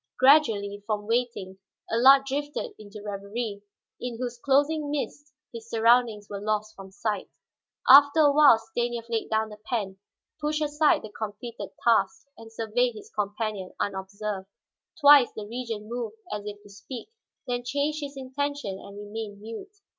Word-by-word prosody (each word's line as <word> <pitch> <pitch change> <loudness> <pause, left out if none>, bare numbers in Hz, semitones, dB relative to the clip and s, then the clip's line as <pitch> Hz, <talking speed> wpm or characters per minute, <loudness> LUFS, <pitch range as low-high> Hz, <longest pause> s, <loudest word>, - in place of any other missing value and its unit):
Gradually, 225 -8 +4
from 210 -2 -2
waiting 225 -5 -2 0.3
Allard 270 +4 +6
drifted 290 - -3
into 205 0 -11
reverie, 205 +1 -4 0.4
in 245 -2 -5
whose 245 0 -4
closing 290 +3 +2
mists 290 0 -4 0.2
his 230 0 -9
surroundings 230 -2 +3
were 200 -1 -6
lost 215 0 -2
from 195 -1 -11
sight. 210 -1 -3 0.6
After 285 +4 +8
a 290 -1 +6
while 290 -4 +7
Stanief 230 +1 -3
laid 225 -1 -2
down 220 0 0
the 210 0 -11
pen, 205 -5 -3 0.4
pushed 300 +1 0
aside 295 +1 +2
the 215 - -7
completed 215 -1 -6
task, 235 -1 +2
and 225 0 -13
surveyed 230 +2 0
his 215 - -11
companion 210 -2 -3
unobserved. 195 0 -4 0.5
Twice 285 -4 +7
the 215 - -6
Regent 225 -1 -5
moved 230 -1 -5 0.2
as 210 0 -5
if 205 0 -8
to 205 - -16
speak, 235 - -9 0.4
then 245 -1 -2
changed 285 +4 -1
his 280 -1 -6
intention 270 -6 -3
and 200 0 -11
remained 205 0 -7
mute. 225 - -8
230 Hz, 150 wpm, -26 LUFS, 210-270 Hz, 0.6 s, After